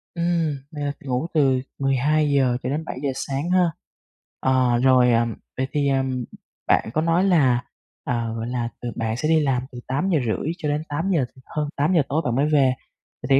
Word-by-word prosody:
Ừm. 170 Hz, -3 st, 0 dB
Là 145 Hz, -2 st, -3 dB
ngủ 130 Hz, +3 st, -2 dB
từ 135 Hz, -5 st, +3 dB, 0.2 s
12:00 140 Hz, -1 st, +2 dB
cho 125 Hz, -, -2 dB
đến 155 Hz, +4 st, -2 dB
7:00 140 Hz, -1 st, -3 dB
sáng 140 Hz, +5 st, -3 dB
ha. 180 Hz, -2 st, +3 dB, 0.7 s
Ờ, 130 Hz, -2 st, +2 dB
rồi, 130 Hz, -2 st, +5 dB
ờ, 115 Hz, 0 st, +3 dB, 0.3 s
vậy 130 Hz, +1 st, 0 dB
thì, 145 Hz, -1 st, +1 dB
ờ, 135 Hz, -1 st, +2 dB, 0.6 s
bạn -, -, +3 dB
có 155 Hz, -, +1 dB
nói 165 Hz, +3 st, +2 dB
là, 135 Hz, -10 st, +3 dB, 0.4 s
ờ, 115 Hz, -2 st, -2 dB
gọi 115 Hz, 0 st, -4 dB
là, 120 Hz, -1 st, -2 dB
từ 120 Hz, -, -3 dB
bạn 110 Hz, 0 st, -2 dB
sẽ 155 Hz, -, -1 dB
đi 160 Hz, 0 st, +5 dB
làm 135 Hz, -4 st, +1 dB
từ 125 Hz, -, -8 dB
8:30 145 Hz, -, 0 dB
cho 155 Hz, -4 st, -3 dB
đến 150 Hz, +1 st, -1 dB
8:00 165 Hz, -1 st, 0 dB, 0.2 s
hơn 150 Hz, -1 st, -3 dB
8:00 160 Hz, +4 st, +3 dB
tối 155 Hz, +3 st, +1 dB
bạn 120 Hz, -, 0 dB
mới 140 Hz, +3 st, +2 dB
về. 140 Hz, -4 st, +3 dB, 0.5 s
Vậy -, -, -5 dB
thì 135 Hz, -, +6 dB
140 Hz, 185 wpm, -23 LUFS, 125-155 Hz, 0.7 s, thì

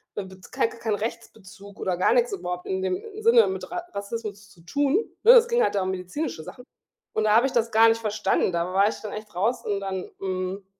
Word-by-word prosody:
Bet 190 Hz, -2 st, -8 dB
kei -, -, +1 dB
kein -, -, -11 dB
kein 220 Hz, -2 st, -1 dB
Rechtsbezug 200 Hz, -2 st, -8 dB
oder 185 Hz, -, -1 dB
gar 185 Hz, -, +3 dB
nix -, -, +2 dB
überhaupt 180 Hz, -, -4 dB
in 190 Hz, 0 st, -2 dB
dem 185 Hz, -1 st, -1 dB, 0.2 s
Sinne 460 Hz, +1 st, +6 dB
mit 385 Hz, -, -5 dB
Ra 355 Hz, -1 st, -4 dB
Rassismus 205 Hz, 0 st, -6 dB
zu 180 Hz, -, -20 dB
tun, 285 Hz, -, +1 dB, 0.2 s
ne? 460 Hz, -, +9 dB
Es 475 Hz, -1 st, +7 dB
ging 475 Hz, 0 st, +2 dB
halt -, -, +1 dB
da 195 Hz, -, +1 dB
um 185 Hz, -, -2 dB
medizinische 185 Hz, -, -4 dB
Sachen. 250 Hz, +9 st, -11 dB, 0.5 s
Und 220 Hz, -, 0 dB
da 210 Hz, -, +4 dB
habe 235 Hz, +3 st, +5 dB
ich 265 Hz, -, -6 dB
das 230 Hz, -2 st, +1 dB
gar 225 Hz, +1 st, +6 dB
nicht 225 Hz, 0 st, +1 dB
verstanden. 215 Hz, -3 st, 0 dB
Da 170 Hz, +2 st, -1 dB
war 200 Hz, +2 st, +4 dB
ich -, -, -6 dB
dann 215 Hz, -, -6 dB
echt 210 Hz, 0 st, -8 dB
raus 220 Hz, +8 st, 0 dB
und 200 Hz, -1 st, -1 dB
dann 190 Hz, -1 st, -4 dB
hm, 190 Hz, 0 st, -4 dB
210 Hz, 235 wpm, -25 LUFS, 190-250 Hz, 0.5 s, ne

